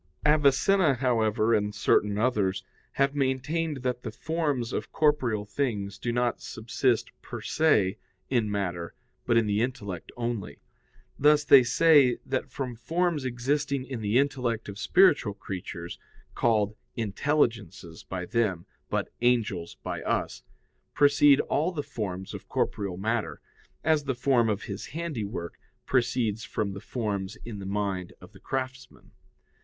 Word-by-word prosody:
Avicenna, 150 +3 +4
however, 115 -3 +2
and 105 -1 0
certain 105 -1 +2
others, 105 -5 +1 0.3
have 140 0 +2
maintained 140 +2 -1
that 125 -1 -1
the - - -5
forms 145 -7 -2
of - - -3
corporeal 130 -9 +1
things 100 -4 -2
do 120 - -2
not 120 0 0
subsist 115 +1 -1
per - - -7
se 105 -12 +2 0.3
in 120 -5 +1
matter, 90 -4 -3 0.3
but 120 - +4
in 115 - +4
the 105 +1 +1
intellect 100 -8 -4
only. 115 -11 -3 0.6
Thus 150 +1 +5
they 140 -3 +8
say 135 0 +5
that - - -2
from 130 -3 -4
forms 165 +3 -1
existing 135 +2 -1
in 130 -4 -5
the 105 +3 +1
intellect 125 -5 0
of 100 0 -7
spiritual 145 - +4
creatures 90 -3 -7 0.3
(called 110 -3 +1 0.2
"intelligences" 115 - -1
by 90 -1 -5
them, 95 -6 0 0.2
but - - -2
"angels" 110 -8 +1
by - - -4
us) - - -2 0.5
proceed 145 -1 +6
all 160 +5 0
the 150 -5 -3
forms 100 -9 -5
of - - -9
corporeal 100 -4 -1
matter, 110 +3 -2 0.4
as 155 -2 +2
the 135 -2 -1
form 120 -2 +2
of 105 -1 -1
his 100 0 -6
handiwork 110 - -4 0.3
proceeds 120 -4 0
from 105 -3 -2
the 100 0 -7
forms 105 -4 -3
in 110 -4 -6
the 95 - -6
mind 100 -3 -2
of - - -14
the - - -16
craftsman. 130 -1 -5
120 Hz, 140 wpm, -27 LUFS, 105-140 Hz, 0.6 s, they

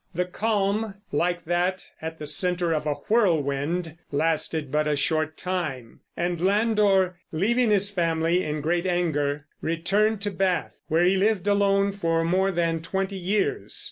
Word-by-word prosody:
The 180 +2 +1
calm, 205 +1 -1 0.2
like 175 +3 0
that 175 +2 -1
at 160 0 -5
the 155 - -7
center 175 +1 0
of 155 -1 -2
a 145 - +1
whirlwind, 165 -5 +1
lasted 155 -1 -1
but 150 +1 +1
a 150 - +2
short 155 +1 0
time, 155 -10 -4 0.2
and 175 -1 -1
Landor, 200 -2 +2
leaving 230 +9 +2
his 200 -1 +2
family 170 -1 +1
in 150 0 -3
great 170 +4 0
anger, 150 -5 0 0.2
returned 195 +6 +1
to 205 - -1
Bath, 185 -1 -1
where 165 +1 +2
he 185 +2 +4
lived 205 -1 +1
alone 200 -1 +3
for 165 -4 0
more 185 +3 +2
than 165 -2 0
twenty 190 +3 -2
years. 195 +3 -1
175 Hz, 150 wpm, -25 LUFS, 160-195 Hz, 0.2 s, he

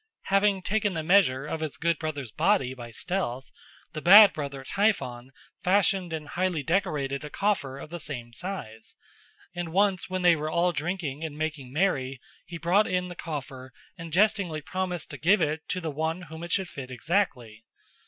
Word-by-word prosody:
Having 195 -1 +3
taken 205 -2 0
the 160 - -2
measure 155 -7 +4
of 160 +2 -4
his 155 -2 -4
good 170 -1 0
brother's 145 -7 -4
body 160 - +2
by 120 -2 -9
stealth, 135 -2 -3 0.4
the 155 - -5
bad 200 +5 +9
brother 140 -3 -5
Typhon 130 - 0 0.3
fashioned 185 -1 +2
and 155 -2 -5
highly 180 -4 -1
decorated 150 -6 -1
a 150 - -6
coffer 145 -9 -1
of 150 - -10
the 175 - -5
same 125 -6 -6
size, 115 - -6 0.6
and 175 -2 -4
once 195 0 +2
when 185 0 -2
they 175 -1 +6
were 155 0 -3
all 170 +2 +2
drinking 155 -2 -3
and 155 -2 -5
making 150 -5 -4
merry 135 -5 0 0.3
he 170 - -6
brought 180 +6 +3
in 180 0 -1
the 175 - -8
coffer 135 -5 -6 0.2
and 165 -3 -9
jestingly 195 -3 +2
promised 180 +2 -4
to - - -6
give 190 +6 +4
it 155 -1 0
to 185 - -2
the 165 -3 -4
one 160 +4 -2
whom 160 -1 -9
it 170 0 -6
should 190 0 +1
fit 135 -6 -8
exactly. 125 - -1
165 Hz, 180 wpm, -27 LUFS, 140-185 Hz, 0.6 s, bad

